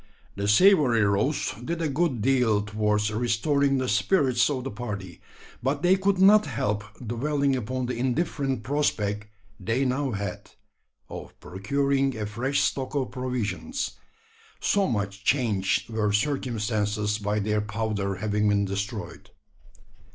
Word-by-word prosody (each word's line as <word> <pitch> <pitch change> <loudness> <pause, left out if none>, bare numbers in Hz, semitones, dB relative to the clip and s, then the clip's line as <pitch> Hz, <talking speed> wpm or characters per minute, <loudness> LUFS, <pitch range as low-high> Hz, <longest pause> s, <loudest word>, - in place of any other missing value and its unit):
The 100 0 -2
savoury 130 - +5
roast 105 +2 0
did 170 +6 -3
a 165 - 0
good 140 -6 0
deal 125 -6 +3
towards 105 0 0
restoring 135 +5 +1
the 130 -1 -1
spirits 125 - +2
of 130 -3 -2
the 135 - -4
party; 100 -6 -6 0.4
but 140 +5 -1
they 180 +2 +5
could 195 0 +1
not 195 -1 +6
help 105 -5 -1 0.2
dwelling 140 +4 0
upon 130 +1 -3
the 125 - -3
indifferent 130 0 -1
prospect 105 -6 -1 0.3
they 115 +7 0
now 135 +2 0
had 100 -2 -5 0.6
of - - -9
procuring 135 +6 0
a 105 - -2
fresh 120 +7 -1
stock 135 +1 -1
of 135 -3 -1
provisions 125 - -3 0.7
so 200 -1 +2
much 100 -3 -3
changed 110 -6 +1
were 110 -2 0
circumstances 105 -4 -1
by 105 0 -1
their 105 0 0
powder 105 -2 -2
having 105 +1 0
been 100 0 +2
destroyed. 100 -2 -5
115 Hz, 135 wpm, -26 LUFS, 105-140 Hz, 0.7 s, not